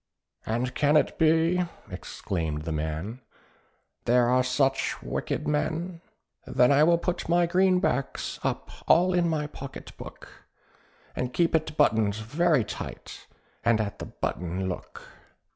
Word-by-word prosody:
"And 120 +3 -1
can 150 +1 +3
it 150 - 0
be," 165 +3 +4 0.3
exclaimed 80 -5 -4
the 80 - -4
man, 80 +10 -3 0.8
"there 120 0 +4
are 130 +1 +4
such 135 +1 +1
wicked - - -3
men? 165 +3 -1 0.5
"Then 125 +1 +4
I 140 +2 +5
will 170 +2 +5
put 175 0 -3
my 175 +1 +4
greenbacks 180 -6 +1
up - - -3 0.2
all 180 +2 +5
in 175 -1 +2
my 155 -2 0
pocket 140 -2 -9
book, - - -12 0.7
And 125 0 -3
keep 170 +3 +2
it 160 -1 0
buttoned 110 -8 +3
very 145 +6 +1
tight, - - -8 0.4
and 115 -2 +3
at 105 -2 -3
the - - -6
button 90 +2 -3
look." 90 - -6
140 Hz, 135 wpm, -27 LUFS, 110-165 Hz, 0.8 s, I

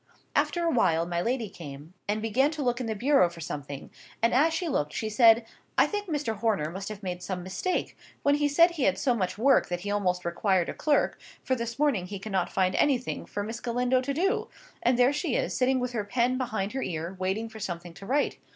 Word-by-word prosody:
After 345 - +1
a 335 - +2
while 165 - +3
my 170 0 -1
lady 235 +1 -1
came, 150 -2 -10
and 210 +1 -1
began 250 +6 +3
to 305 -2 -3
look 245 -1 0
in 240 - -3
the 220 - -2
bureau 260 -4 +4
for 170 -1 -12
something: 145 -3 -6 0.3
and 230 - +2
as 300 +6 +4
she 325 +2 -2
looked 150 - -1
she 220 -1 -3
said—"I 225 0 +3
think 415 -1 -3
Mr. 290 -8 -1
Horner 200 -8 0
must 195 +3 -5
have 210 -1 -8
made 180 -1 -4
some 180 -1 -4
mistake, 195 - -2 0.3
when 285 - +4
he 295 0 +2
said 335 +5 +5
he 310 -6 -1
had 190 -1 +2
so 250 - +2
much 185 -5 -2
work 265 +4 +4
that 175 0 -2
he 205 +2 -3
almost 180 -3 0
required 175 +1 +1
a - - -3
clerk, 295 -2 +1 0.2
for 260 - 0
this 235 -2 -3
morning 270 -12 +1
he 200 +1 -5
cannot 190 -2 -2
find 185 -1 +1
anything 260 -4 +1
for 205 - -3
Miss 225 +2 -5
Galindo 250 +2 +1
to 270 +2 -2
do; 390 +7 +1 0.3
and 245 0 +3
there 250 +3 +4
she 300 -3 -1
is, - - -1
sitting 260 0 +2
with 250 0 -2
her 225 -4 -2
pen 240 +4 +1
behind 220 -6 -2
her 265 - -3
ear, 170 -1 -4
waiting 190 +5 -1
for 220 -1 -11
something 175 -3 -5
to 195 - -11
write. 285 +4 +1
225 Hz, 230 wpm, -28 LUFS, 185-260 Hz, 0.3 s, said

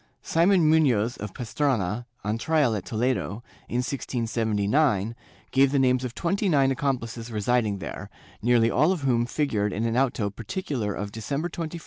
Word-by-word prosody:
Simon 170 +1 +3
Munoz 125 -8 +3
of 105 -1 -6
Pastrana, 120 -3 -1 0.2
on 105 +2 -1
trial 150 -4 +2
at 95 -3 -4
Toledo, 115 -2 -1 0.3
in 125 +1 0
1679, 115 -2 0 0.4
gave 135 0 +4
the 140 - +2
names 130 -1 +3
of 125 -2 -5
twenty 195 +3 0
nine 135 -4 +3
accomplices 120 -3 -2
residing 110 -1 +1
there, - - -7 0.3
nearly 115 0 +3
all 155 +7 +3
of 185 -5 -2
whom 120 -3 +1
figured 110 -9 0
in 110 +4 -2
an 115 0 0
auto 120 -5 +1
particular 115 - -3
of 100 +1 -4
December 140 - -3
21, 165 0 -4
1680. 170 +2 -7
120 Hz, 160 wpm, -26 LUFS, 110-140 Hz, 0.4 s, gave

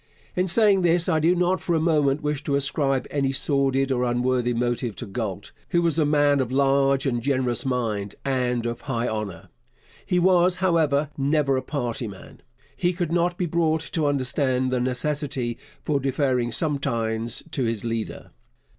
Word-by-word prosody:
In 180 +1 +1
saying 200 0 +4
this 170 -1 +2
I 160 - +2
do 165 +3 +3
not 180 +1 +1
for 170 - 0
a - - +2
moment 150 -3 +2
wish 150 -1 -2
to 140 - +1
ascribe 135 -1 0
any 135 -2 0
sordid 135 -1 +1
or 125 -1 +1
unworthy 125 0 +1
motive 120 -2 -1
to - - -7
Galt, 100 -1 -5 0.2
who 170 -2 +2
was 165 -1 +1
a 150 - +3
man 145 -1 +3
of 130 -2 -1
large 135 0 +2
and 120 -3 0
generous 130 -2 0
mind 110 -6 -2
and 125 -3 0
of 120 0 -3
high 120 -4 -2
honour. 105 -6 -5 0.5
He 180 - 0
was, 180 0 +4
however, 155 -6 +1
never 140 0 +2
a 130 - 0
party 120 -4 -3
man. 100 -2 -12 0.3
He 175 0 0
could 175 -2 -3
not 175 +1 +1
be 180 - 0
brought 160 -1 +1
to 155 -4 +1
understand 130 -1 0
the 125 -1 0
necessity 130 -1 -2 0.3
for 145 -2 +1
deferring 130 -3 0
sometimes 115 -6 -1
to 135 -6 -1
his 115 -1 -2
leader. 115 -1 -4
135 Hz, 170 wpm, -24 LUFS, 120-155 Hz, 0.5 s, saying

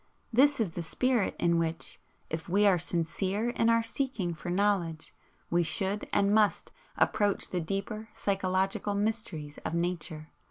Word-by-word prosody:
This 280 +3 +5
is 210 -7 0
the 170 - -4
spirit 235 +7 0
in 170 -1 +2
which, 165 0 -2 0.3
if 160 +2 -5
we 200 +4 +4
are 190 -3 +5
sincere 185 +7 -1
in 230 -1 +2
our 230 0 +4
seeking 225 -7 -2
for 165 +2 -7
knowledge, 180 -4 0 0.4
we 175 +1 +3
should 195 +4 0
and 200 0 +3
must 215 -1 +2 0.3
approach 205 -1 +2
the 180 - -1
deeper 205 +6 -4
psychological 195 +1 0
mysteries 200 -9 -2
of 165 - -4
Nature. 170 -3 -3
195 Hz, 150 wpm, -30 LUFS, 170-215 Hz, 0.4 s, This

